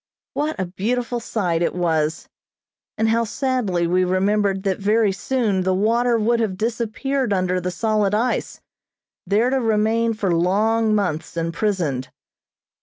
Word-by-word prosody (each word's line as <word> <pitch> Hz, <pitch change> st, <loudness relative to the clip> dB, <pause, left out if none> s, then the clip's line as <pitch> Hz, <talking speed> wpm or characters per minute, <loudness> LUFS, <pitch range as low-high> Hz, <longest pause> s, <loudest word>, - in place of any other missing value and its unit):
What 300 Hz, -4 st, -2 dB
a 190 Hz, -, 0 dB
beautiful 235 Hz, +7 st, -2 dB
sight 180 Hz, -8 st, -1 dB
it 175 Hz, -, 0 dB
was, 160 Hz, -3 st, 0 dB, 0.7 s
and 220 Hz, 0 st, +2 dB
how 230 Hz, +1 st, +2 dB
sadly 225 Hz, -7 st, -1 dB
we 180 Hz, +2 st, +2 dB
remembered 195 Hz, +1 st, +1 dB
that 195 Hz, -1 st, -1 dB
very 210 Hz, +1 st, +2 dB
soon 205 Hz, -1 st, 0 dB
the 185 Hz, 0 st, +1 dB
water 235 Hz, +4 st, +2 dB
would 230 Hz, +2 st, +1 dB
have 205 Hz, -5 st, -1 dB
disappeared 235 Hz, +3 st, -1 dB
under 185 Hz, -1 st, 0 dB
the 180 Hz, -, -2 dB
solid 210 Hz, +2 st, 0 dB
ice, 240 Hz, +4 st, -1 dB, 0.7 s
there 220 Hz, +5 st, +2 dB
to 270 Hz, -, +2 dB
remain 225 Hz, 0 st, +1 dB
for 195 Hz, -5 st, 0 dB
long 215 Hz, +6 st, +2 dB
months 170 Hz, -5 st, -2 dB
imprisoned. 165 Hz, -6 st, -1 dB
210 Hz, 140 wpm, -21 LUFS, 185-230 Hz, 0.7 s, and